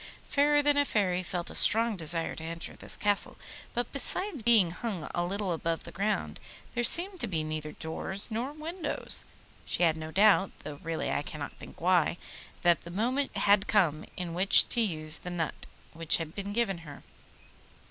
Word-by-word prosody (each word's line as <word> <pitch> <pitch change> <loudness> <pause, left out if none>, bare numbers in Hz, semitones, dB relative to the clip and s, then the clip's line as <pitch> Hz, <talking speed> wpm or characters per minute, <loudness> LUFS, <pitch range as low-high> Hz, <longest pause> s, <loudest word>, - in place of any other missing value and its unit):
Fairer 290 +1 +3
than 290 0 +3
a 285 - +5
Fairy 185 -8 0
felt 175 -1 -4
a - - -9
strong 225 0 +4
desire 165 -1 -1
to 160 - -8
enter 165 +1 -7
this - - -2
Castle, 205 -1 0 0.4
but 240 +1 -2
besides 310 - 0
being 215 -6 +4
hung 185 -4 -5
a 175 - -1
little 195 +1 -2
above 165 0 -3
the - - -9
ground 205 +2 -2 0.3
there 240 - -1
seemed 360 +9 +4
to 240 - 0
be 165 -5 -2
neither 155 -1 -5
doors 190 +7 -3
nor 235 +5 -3
windows. 310 +1 -3 0.4
She - - -1
had 165 -2 +3
no 155 0 -6
doubt 195 +2 +4
(though 145 -1 -8
really 165 0 -3
I - - 0
cannot 145 0 -7
think - - -13
why) 175 -1 +2 0.5
that 175 -1 +4
the 170 - -10
moment 240 +7 -1
had 200 0 +3
come 165 -7 +2
in 175 -2 -4
which 185 +3 +7
to 240 - +2
use 155 -6 +2
the 180 - -7
nut 170 -3 -4 0.3
which 165 -1 +2
had 165 -1 -6
been 200 +1 -5
given 205 -5 -1
her. 150 -4 -12
190 Hz, 185 wpm, -29 LUFS, 165-230 Hz, 0.5 s, which